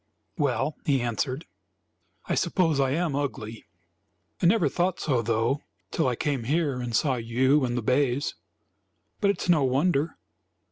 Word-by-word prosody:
"Well," 150 - 0
he 140 -3 +2
answered, 130 +5 -2 0.8
"I - - -1
suppose 165 -6 +1
I 135 -1 +3
am 155 +1 0
ugly. 115 -6 -4 0.8
I 175 - +4
never 185 -4 +4
thought 180 +5 0
so, 130 -6 +1
though, 115 +5 0 0.3
till 160 - +1
I 125 - +1
came 135 -3 -2
here 145 -2 0
and 120 -2 -3
saw 135 +1 +2
you 130 +5 +2
and 120 0 -2
the 120 - -2
bays. 135 +3 +1 0.9
But 200 - +2
it 200 - 0
is - - -4
no 160 -5 +5
wonder. 140 +4 +1
140 Hz, 155 wpm, -26 LUFS, 125-160 Hz, 0.9 s, no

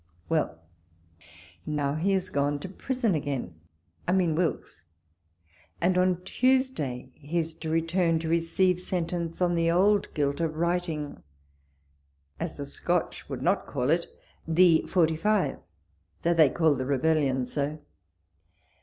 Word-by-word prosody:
Well! 155 - 0 1.0
now 145 -2 -1
he 175 +6 +1
is 185 -1 -1
gone 145 -1 +1
to - - -5
prison 240 +1 -1
again 145 - -3 0.3
— 85 0 -37
I 180 - +2
mean 180 -4 +2
Wilkes; 165 - -2 0.9
and 180 +2 +2
on 180 -1 +2
Tuesday 215 - 0
he 150 +4 -5
is 165 -1 -1
to 160 - -5
return 165 +1 +1
to 160 0 -4
re 170 +1 +3
ceive 180 +2 +1
sentence 175 -1 -2
on 175 -1 +2
the 165 -1 +2
old 195 +4 +3
guilt 140 0 0
of 160 -2 -1
writing, 170 -3 -2 1.2
as - - -4
the - - -4
Scotch - - -2
would - - -5
not - - +1
call 125 +4 0
it, 170 +1 +1 0.4
the 165 0 +5
45, 175 0 +1 0.6
though 170 - +3
they 160 -4 +6
call 160 +1 +3
the 130 -2 -3
rebellion 140 -2 +1
so. 145 +4 -2
165 Hz, 140 wpm, -27 LUFS, 150-180 Hz, 1.2 s, they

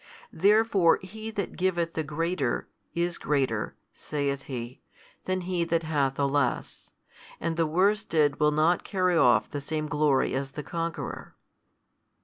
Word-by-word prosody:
Therefore 200 -2 +4
He 220 +4 -7
that 200 -4 -4
giveth 175 -2 0
the 160 - -1
greater, 155 -2 -1 0.3
is 170 0 -1
greater 135 -7 0 0.2
(saith 140 -2 -3
He) 125 -1 -6 0.4
than 185 0 -1
he 180 -1 -1
that 165 0 0
hath 145 -4 0
the 140 0 +1
less, 140 -1 -1 0.5
and 165 -1 -2
the 165 -1 +1
worsted 165 -4 +2
will 150 - +4
not 155 +4 +2
carry 185 -3 +1
off 125 -7 +4
the 145 - -4
same 155 +2 -3
glory 150 -2 +2
as 135 0 -3
the 150 - -3
conqueror. 165 0 -5
160 Hz, 140 wpm, -27 LUFS, 145-180 Hz, 0.5 s, Therefore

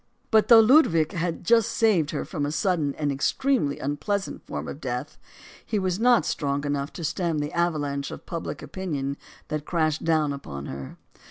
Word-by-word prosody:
But, 220 -1 +5
though 230 -2 +9
Ludwig 215 - +5
had 170 -3 -3
just 230 +3 +4
saved 195 -10 +3
her 150 - -3
from 150 -6 -4
a 145 - -1
sud 180 +2 +1
den 145 -2 -1
and 150 -2 0
extremely 150 - +1
unpleasant 190 +8 -3
form - - -5
of - - -7
death, - - -4 0.4
he 215 - -2
was 185 -1 -1
not 240 0 +4
strong 140 -1 -1
enough 145 0 -2
to 170 - -7
stem 165 +1 -1
the 145 0 -3
avalanche 145 -5 -1
of - - -9
public 165 -1 -5
opinion 145 -7 -3 0.3
that 150 -1 -2
crashed 155 -3 0
down 155 -3 +2
upon 70 - -7
her. 70 -1 -7
160 Hz, 180 wpm, -25 LUFS, 145-190 Hz, 0.4 s, though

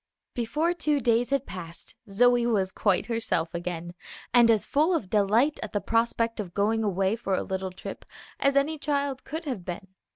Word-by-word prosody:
Before 300 +9 0
two 305 -4 0
days 235 -1 +2
had 275 0 0
passed 170 -2 -8 0.2
Zoe 245 +3 +4
was 195 -5 +1
quite 195 -2 +1
herself 225 -8 -1
again, 175 0 -4 0.4
and 240 -2 +6
as 220 -2 +3
full 315 +5 +2
of 200 - -3
delight 220 +8 +3
at - - -6
the 205 - +1
prospect 230 +1 0
of 185 -5 -5
going 220 +2 +1
away 195 0 +1
for 200 -5 -1
a - - -1
little 190 0 -3
trip 185 - -8 0.4
as 275 0 +2
any 295 +3 +1
child 280 -2 -1
could 320 +3 -6
have 250 -11 -4
been. 180 +2 -7
230 Hz, 185 wpm, -27 LUFS, 190-275 Hz, 0.4 s, and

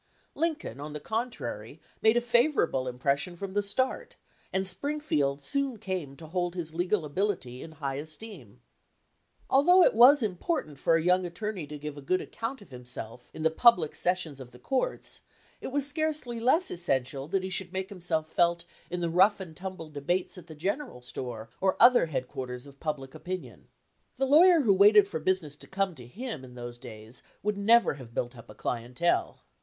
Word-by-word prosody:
Lincoln, 310 - -2
on 150 +1 -6
the 150 - -4
contrary, 150 - -4 0.2
made 220 +2 +5
a - - +3
favorable 240 - +2
impression 140 +7 -1
from 190 +2 -6
the 205 - +2
start, 205 +6 -1 0.4
and 190 0 0
Spring 285 +12 +1
field 140 - 0
soon 275 - -1
came 185 -10 -4
to 165 - -11
hold 175 +2 -2
his 165 -3 -4
legal 175 +1 0
ability 145 -7 -2
in 160 - -9
high 140 -3 -4
esteem. 160 +9 -8 0.9
Although 355 +7 +6
it - - +5
was 255 +4 +7
important 185 - -2
for 165 - +3
a 165 - +1
young 180 +1 +4
attor 180 +5 -4
ney 175 -7 -6
to 150 +1 -7
give 150 0 -7
a - - -10
good 185 +7 +1
account 230 0 -5
of 180 - -21
himself 125 -1 -7
in 155 - -7
the 160 - +3
public 175 -5 +5
sessions 175 -6 -1
of 130 -2 -9
the 125 - -15
courts, 270 - -2 0.4
it - - -5
was 280 +1 0
scarcely 290 -5 -1
less 290 +10 +3
essential 135 -5 -1
that 190 +3 0
he 190 - -4
should 180 -1 -3
make 190 0 -3
himself 170 -5 -2
felt 170 +1 +1 0.2
in 180 0 -3
the 170 - +1
rough 190 +5 +5
and 175 -4 -8
tumble 185 -4 -7
debates 175 +6 -1
at 180 -3 -11
the 155 - -10
general 195 - -3
store 120 -3 -6
or 190 -1 +2
other 240 -7 +7
headquarters 125 -3 -5
of 140 -1 -15
public 140 -4 -4
opinion. 175 +4 -7 0.5
The 270 - +2
law 290 +4 +7
yer 355 -3 +7
who 215 -7 +4
waited 205 +1 +7
for 160 -5 -4
business 160 -3 -1
to - - -10
come 195 -1 -1
to 125 -6 -12
him 210 - -6
in 125 -1 -12
those 120 0 -7
days 115 -1 -10 0.2
would 210 0 0
never 225 +4 +4
have 115 -2 -13
built 120 +1 -2
up 115 - -13
a 105 - -11
clientele. 125 +8 -1
175 Hz, 190 wpm, -29 LUFS, 140-215 Hz, 0.9 s, was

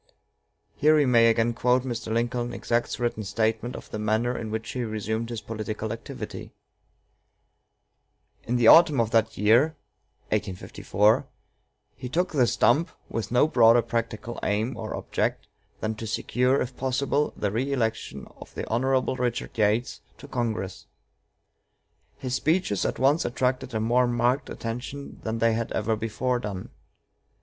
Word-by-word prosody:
Here 155 +1 +4
we 150 -2 +4
may 120 -2 +5
again 115 +1 +2
quote 125 +1 +2
Mr. 120 -3 -4
Lincoln's 120 +1 -1
exact 120 0 -1
written 120 -3 -2
statement 110 +4 -1
of - - -10
the 105 - -4
manner 110 +3 0
in 110 - -4
which 110 +3 -4
he 130 -2 -3
resumed 110 +1 -3
his 115 -3 -5
political 110 0 -4
activity: 115 - -8 1.9
"In 120 - -1
the 120 -2 +2
autumn 155 +1 +7
of 115 -1 +1
that 115 -1 +2
year 120 +10 +4 0.6
he - - +4 1.7
took 175 +7 0
the 130 -6 +3
stump, 120 +8 +3 0.2
with 115 -3 -3
no 125 +5 +4
broader 120 -4 +5
practical 115 0 -3
aim 110 +5 -1
or 110 -1 -5
object - - -2 0.4
than 110 0 -1
to 115 - -5
secure, 125 +4 +1
if 125 0 -3
possible, 140 +3 0
the 100 - -1
reëlection 115 -1 -2 0.2
of - - -12
Hon. 130 +3 +1
Richard 120 -1 -2
Yates 110 +3 +1 0.2
to 145 - -12
Congress. 115 -7 -3 1.3
His 130 -2 -4
speeches 155 - +1
at - - -3
once 140 +6 +3
attracted 130 0 -1
a - - +1
more 120 +3 +3
marked 120 +2 +1
attention 125 +5 -6
than 110 +1 -3
they 115 0 +3
had 115 0 -2
ever 110 +1 0
before 120 +3 -1
done. 100 -5 -6
120 Hz, 140 wpm, -26 LUFS, 110-125 Hz, 1.9 s, autumn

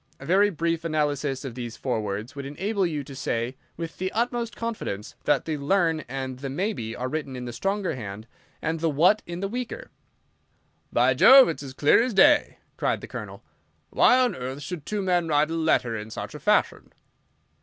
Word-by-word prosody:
A 135 - -10
very 195 +5 +4
brief 165 -2 -1
analysis 145 -4 -1
of 130 - -5
these 120 -2 -6
four 125 -3 -1
words 105 +5 -5
would 140 - -5
enable 190 +6 -1
you 150 -4 -3
to 135 0 -10
say 120 -1 -2 0.2
with 165 0 -6
the 185 +1 -2
utmost 235 -1 -1
confidence 215 - -4
that - - +2
the 155 -2 -2
'learn' 165 +1 +2
and 130 -1 -5
the 135 0 -5
'maybe' 140 - -3
are 125 - -3
written 140 -1 -4
in 125 -1 -6
the 120 - -6
stronger 195 - -1
hand, 105 -3 -7 0.4
and 160 +1 -1
the 165 0 +1
'what' 180 +9 +4
in 175 +1 -5
the 195 - -1
weaker." 250 - -6 1.0
"By - - +3
Jove, 265 -4 +8
it's 160 - -4
as 135 -2 -8
clear 145 +10 +5
as 240 -3 -1
day!" 295 +8 +5 0.2
cried - - 0
the - - -8
Colonel. - - -8 0.5
"Why 250 - +5
on 255 -1 +2
earth 130 +3 -6
should 160 -2 -6
two 210 -2 -2
men 175 -2 +1
write 150 0 +2
a - - -1
letter 160 -8 +1
in 105 0 -6
such - - -6
a - - -8
fashion?" - - +1
155 Hz, 195 wpm, -25 LUFS, 130-195 Hz, 1.0 s, Jove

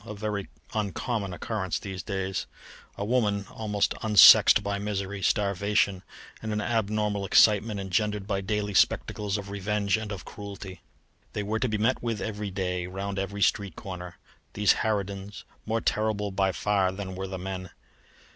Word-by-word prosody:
a 105 -1 -7
very 100 -1 -3 0.3
uncommon 105 0 -2
occurrence 95 0 -3
these 95 -3 -6
days: 95 +1 -3 0.5
a 100 - -2
woman 105 -4 +1
almost 105 -2 0
unsexed 105 -1 +8
by 100 0 -2
misery, 100 -1 -3
starvation, 100 -1 +1 0.4
and 110 - -4
the 105 -1 -1
abnormal 105 -3 0
excitement 105 +2 +4
engendered 100 +2 -1
by 100 -1 -1
daily 105 +1 -2
spectacles 100 +1 +1
of 100 -1 -7
revenge 100 0 0
and 110 -1 -5
of 100 - -6
cruelty. 100 -2 -8 0.5
They 105 - -2
were 110 +2 -1
to 125 - 0
be 110 - 0
met 115 +5 +1
with 115 -3 -2
every 105 -2 -4
day, 90 -2 -2
round 95 +1 -4
every 100 +1 -1
street 100 -3 +1
corner, 90 -2 -8 0.4
these 105 -1 +4
harridans, 100 -1 -2 0.2
more 110 +1 0
terrible 105 -2 0 0.2
far 95 0 +1
than 95 0 -6
were 95 +1 -4
the 95 0 -5
men. 95 0 -5
100 Hz, 155 wpm, -27 LUFS, 95-105 Hz, 0.5 s, unsexed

